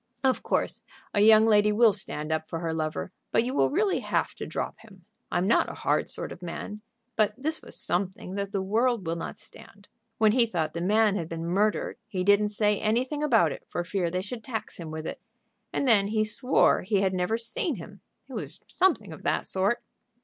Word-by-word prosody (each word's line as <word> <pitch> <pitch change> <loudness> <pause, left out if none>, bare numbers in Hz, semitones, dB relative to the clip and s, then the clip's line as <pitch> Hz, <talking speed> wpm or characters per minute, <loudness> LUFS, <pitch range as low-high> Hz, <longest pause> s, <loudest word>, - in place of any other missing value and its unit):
"Of 260 -1 +2
course - - 0 0.3
a 205 - +2
young 220 +1 +7
lady 210 -1 +4
will 220 0 +5
stand 150 -3 +2
up 160 0 -1
for 165 - -4
her 165 -1 -2
lover, 155 +2 -3 0.2
but - - +3
you 255 +2 -3
will - - +3
really 390 +6 +1
have - - -1
to - - -7
drop - - -4
him. 195 -6 -17 0.3
I'm 175 - +1
not 230 - +3
a - - -7
hard - - 0
sort - - -2
of - - -9
man, 205 +4 -6 0.3
but 215 -1 +2
this 310 +4 -1
was - - -8
something 185 +1 -2
that 200 0 -3
the 195 -2 -1
world 225 +1 +1
will 165 +1 -1
not 165 - -6
stand. 200 0 -14 0.3
When 215 -1 +4
he 235 0 +3
thought 160 -7 -2
the 170 - -4
man 210 +2 +3
had 165 -3 -4
been 165 0 -5
murdered 205 +5 0
he 190 -4 -2
didn't 205 +2 +4
say 210 -1 +1
anything 255 +7 0
about 225 - +3
it - - -7
for 175 - -2
fear 180 -1 -1
they 180 +2 -2
should 225 +2 -7
tax 220 -2 -5
him 165 -2 -6
with 155 0 -6
it. - - -6 0.5
And 280 - -1
then 205 -4 +5
he 215 +1 +1
swore 235 +5 +3
he 195 +1 +1
had 190 -1 +1
never 185 +5 0
seen 330 - -1
him. 200 +2 -11 0.3
It 265 - -11
was - - -4
something 375 -1 +1
of - - -11
that - - 0
sort." 195 +5 0
205 Hz, 215 wpm, -27 LUFS, 180-225 Hz, 0.5 s, young